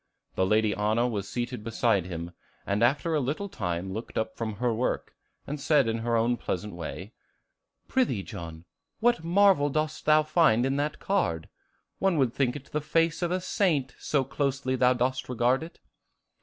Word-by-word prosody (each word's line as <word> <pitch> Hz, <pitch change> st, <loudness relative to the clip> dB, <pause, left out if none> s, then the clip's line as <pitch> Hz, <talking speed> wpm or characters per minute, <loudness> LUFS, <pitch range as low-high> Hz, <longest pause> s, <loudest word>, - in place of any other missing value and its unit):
The 95 Hz, -, +1 dB
Lady 110 Hz, 0 st, +3 dB
Anna 110 Hz, +4 st, +1 dB
was 100 Hz, -4 st, -3 dB
seated 120 Hz, 0 st, -4 dB
beside 110 Hz, -4 st, +1 dB
him, 85 Hz, -1 st, -5 dB, 0.3 s
and 100 Hz, +2 st, 0 dB
after 145 Hz, +7 st, +2 dB
a 155 Hz, -, +2 dB
little 145 Hz, +9 st, -2 dB
time 90 Hz, -, -3 dB
looked 110 Hz, +3 st, -6 dB
up 110 Hz, -, -2 dB
from 110 Hz, -2 st, -3 dB
her 120 Hz, +2 st, 0 dB
work, 120 Hz, +3 st, -2 dB, 0.3 s
and 150 Hz, +1 st, -5 dB
said 145 Hz, -4 st, +3 dB
in 115 Hz, 0 st, -1 dB
her 115 Hz, 0 st, 0 dB
own 120 Hz, +2 st, +2 dB
pleasant 105 Hz, 0 st, -4 dB
way, 90 Hz, +5 st, -7 dB, 0.7 s
"Prithee, 235 Hz, -, +1 dB
John, 80 Hz, -1 st, -8 dB, 0.3 s
what 235 Hz, -7 st, +2 dB
marvel 175 Hz, -4 st, +4 dB
dost 155 Hz, +2 st, -2 dB
thou 155 Hz, 0 st, +5 dB
find 155 Hz, -7 st, +3 dB
in 135 Hz, +1 st, 0 dB
that 145 Hz, +1 st, -1 dB
card? 85 Hz, -, -1 dB, 0.5 s
One 195 Hz, -4 st, +2 dB
would 130 Hz, -5 st, +2 dB
think 125 Hz, -3 st, 0 dB
it 140 Hz, -2 st, -10 dB
the 150 Hz, -, -1 dB
face 165 Hz, +3 st, +1 dB
of 175 Hz, -, 0 dB
a 180 Hz, +1 st, 0 dB
saint, 165 Hz, -8 st, 0 dB
so 140 Hz, -3 st, +1 dB
closely 135 Hz, 0 st, -1 dB
thou 125 Hz, 0 st, +4 dB
dost 125 Hz, +1 st, -1 dB
regard 125 Hz, +2 st, +2 dB
it." 165 Hz, +2 st, -9 dB
125 Hz, 180 wpm, -27 LUFS, 110-150 Hz, 0.7 s, thou